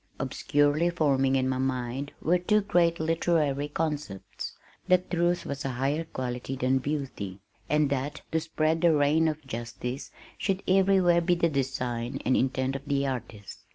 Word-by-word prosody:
Obscurely 145 +4 +1
forming 135 -6 +2
in 130 -1 +2
my 130 0 -1
mind 130 +1 -2
were 175 +3 +3
two 210 +4 +2
great 170 -4 +2
literary 160 -3 +1
concepts 150 -9 -4 0.3
that 185 -1 +2
truth 175 0 +1
was 140 -2 -4
a 135 - -1
higher 145 +5 0
quality 130 -2 -4
than 130 0 +1
beauty, 130 -9 -4 0.3
and 150 -2 +2
that 140 +2 -2
to 160 - +2
spread 160 0 0
the 170 -2 +5
reign 150 +3 +3
of 155 -1 -3
justice 125 +2 -5 0.3
should 195 -1 -1
everywhere 185 -2 +4
be 175 +1 +2
the 170 -1 +2
design 125 -4 -2
and 130 - +3
intent 130 +1 0
of 135 - -5
the 140 -1 +1
artist. 115 -6 -5
145 Hz, 155 wpm, -28 LUFS, 130-165 Hz, 0.3 s, the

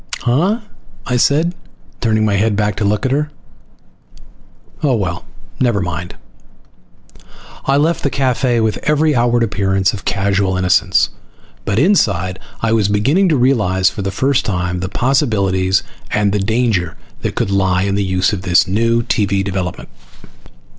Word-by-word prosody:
"Huh?" 175 - +1 0.4
I 125 - -1
said, 155 +7 +2 0.5
turning 110 -2 +1
my 105 - +1
head 105 +1 +1
back 105 -1 0
to - - -1
look 105 +2 0
at 130 - 0
her. 150 +2 0 1.5
"Oh. 140 -5 +2
Well, 90 -5 -3 0.3
never 120 -5 +2
mind." 90 -1 -4 1.5
I 135 +1 +2
left 160 +4 +1
the 140 - 0
cafe 130 -2 0
with 110 -1 0
every 150 0 +2
outward 120 -1 +2
appearance 95 -2 0
of 100 - -7
casual 100 -1 0
innocence; 95 +1 +2 0.5
but 100 - -1
inside 100 - +2 0.2
I 115 - +1
was 110 -3 +2
beginning 135 - +2
to 155 - +2
realize 105 -8 +2
for - - -6
the 100 - -2
first 135 +7 +1
time 90 -2 -2
the 90 0 -4
possibilities 100 -8 +1 0.3
and 105 -1 +1
the 105 - +1
danger 105 -5 0 0.2
that - - -3
could 100 - -1
lie 95 -2 +1
in 100 0 -1
the 100 0 0
use 95 +1 0
of 100 - -3
this 90 -1 +3
new 115 +4 +1
TV 100 -3 0
development. 95 -3 -4
105 Hz, 155 wpm, -17 LUFS, 95-125 Hz, 1.5 s, this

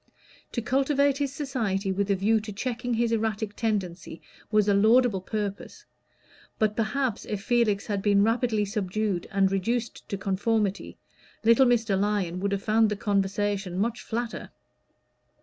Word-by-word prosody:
To 235 - -2
cultivate 275 +2 +2
his 280 -2 -1
society 225 -9 -2
with 200 +1 -1
a 200 - +3
view 215 +4 +2
to 215 0 -7
checking 245 +3 -3
his 230 0 +1
erratic 220 -2 -1
tendencies 185 -8 -3 0.3
was 215 -1 +3
a 205 - +4
laudable 220 0 +4
purpose; 205 0 -5 0.7
but 215 -1 +1
perhaps 230 +1 -1
if 210 -1 -5
Felix 230 -5 +1
had 205 -2 -2
been 200 0 +3
rapidly 225 -1 +1
subdued 200 -2 -2
and 195 -1 +2
reduced 230 +5 -2
to 200 - -2
conformity, 200 +1 -1 0.5
little 230 +4 +5
Mr. 225 -5 +2
Lyon 195 -4 0
would 200 +1 -1
have 200 -1 -2
found 220 0 +3
the 210 - -1
conversation 200 -2 -1
much 230 +4 -1
flatter. 235 +1 -4
215 Hz, 150 wpm, -26 LUFS, 200-230 Hz, 0.7 s, little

